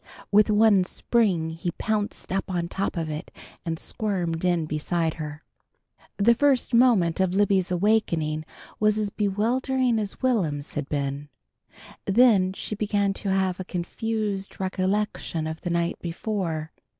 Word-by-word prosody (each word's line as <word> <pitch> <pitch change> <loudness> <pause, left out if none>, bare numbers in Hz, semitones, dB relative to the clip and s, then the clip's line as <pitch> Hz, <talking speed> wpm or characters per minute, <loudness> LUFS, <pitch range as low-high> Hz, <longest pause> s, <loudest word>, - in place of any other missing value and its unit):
With 210 +1 +5
one 210 -2 +5
spring 185 -5 +1
he 165 +2 -3
pounced 210 -3 -2
up 195 0 -1
on 175 -2 -1
top 195 -1 -2
of 165 -1 -1
it, 155 0 -5 0.3
and 165 -2 -2
squirmed 175 -5 -2
in 175 -3 +2
beside 160 +2 -1
her. 150 0 -6 0.7
The 220 +4 +5
first 265 0 +2
moment 225 -9 +4
of 190 -1 +1
Libby's 195 -2 +2
awakening 170 -5 +1 0.4
was 215 0 +3
as 210 -2 -1
bewildering 235 +5 +1
as 205 -2 -4
Will'm's 165 - 0
had 150 -1 -4
been. 140 0 -2 0.8
Then 195 -3 +5
she 205 - -5
began 205 -1 0
to 195 - -3
have 190 -1 +1
a - - -3
confused 200 +2 -3
recollection 190 -3 -1
of 160 0 -5
the 175 - -3
night 170 0 0
before. 170 -3 -3
190 Hz, 140 wpm, -25 LUFS, 165-215 Hz, 0.8 s, With